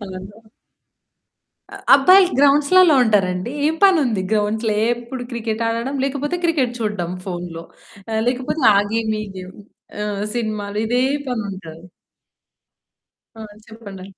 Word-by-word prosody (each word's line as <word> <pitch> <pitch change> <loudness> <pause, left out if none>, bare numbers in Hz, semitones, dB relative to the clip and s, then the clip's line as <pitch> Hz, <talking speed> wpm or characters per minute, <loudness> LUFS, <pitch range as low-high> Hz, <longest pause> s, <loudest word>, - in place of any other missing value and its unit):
అవునా? 190 -1 -8 1.5
అ - - -8 0.2
అబ్బాయిలు 365 +7 +5
గ్రౌండ్సులల్లో 295 +5 +5
ఉంటారండి. 195 -3 0 0.2
ఏం 315 - +1
పనుంది 290 - +3
గ్రౌండ్స్‌లో? 215 +1 0 0.2
ఏప్పుడు 240 +1 -4
క్రికెట్ 230 -2 -3
ఆడడం 230 +4 -3
లేకపోతే 285 +4 -2
క్రికెట్ 290 -8 +1
చూడ్డం 205 -6 -3
ఫోన్‌‌లో. 175 -3 -6 0.5
ఆహ్, 220 0 0
లేకపోతే 255 +4 -2
ఆ - - +4 0.2
గేమ్, 225 -1 -1
ఈ - - -6
గేమ్. 185 0 -10 0.5
ఆహ్, 205 -1 -3
సినిమాలు 215 -3 -3
ఇదే 245 +2 +1 0.3
పనుంటది. 190 -8 -6 1.5
ఆ! - - -9 0.3
చెప్పండి. 205 -4 -11
225 Hz, 115 wpm, -20 LUFS, 200-270 Hz, 1.5 s, అబ్బాయిలు